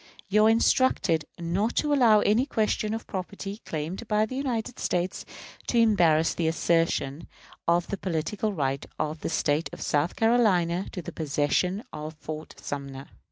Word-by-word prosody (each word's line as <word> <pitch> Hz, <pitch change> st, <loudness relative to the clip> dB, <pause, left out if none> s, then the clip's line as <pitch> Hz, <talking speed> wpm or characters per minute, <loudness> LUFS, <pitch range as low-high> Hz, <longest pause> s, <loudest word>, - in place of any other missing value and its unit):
You 215 Hz, +2 st, +5 dB
are -, -, +6 dB
instructed 225 Hz, -, +3 dB
not 180 Hz, +7 st, -1 dB
to 295 Hz, -1 st, +1 dB
allow 230 Hz, -6 st, +5 dB
any 225 Hz, +7 st, +2 dB
question 215 Hz, -2 st, 0 dB
of 225 Hz, -, -6 dB
property 200 Hz, +2 st, -6 dB
claimed 165 Hz, +8 st, -4 dB
by 215 Hz, 0 st, +2 dB
the 255 Hz, -, -7 dB
United 250 Hz, -3 st, -2 dB
States 180 Hz, +1 st, -1 dB, 0.4 s
to 240 Hz, -, +1 dB
embarrass 170 Hz, -9 st, +4 dB
the 165 Hz, -, -1 dB
assertion 165 Hz, -3 st, 0 dB, 0.4 s
of 170 Hz, +1 st, +3 dB
the 200 Hz, -, -4 dB
political 190 Hz, +4 st, -2 dB
right 135 Hz, -6 st, -1 dB
of 155 Hz, +1 st, -2 dB
the -, -, -3 dB
State 150 Hz, +3 st, 0 dB
of -, -, -9 dB
South 150 Hz, +3 st, 0 dB
Carolina 195 Hz, -6 st, +2 dB
to 180 Hz, -, -5 dB
the -, -, -6 dB
possession 160 Hz, -, 0 dB
of 155 Hz, +1 st, -6 dB
Fort 155 Hz, +1 st, -7 dB
Sumter. 140 Hz, -1 st, -6 dB
180 Hz, 160 wpm, -27 LUFS, 155-220 Hz, 0.4 s, are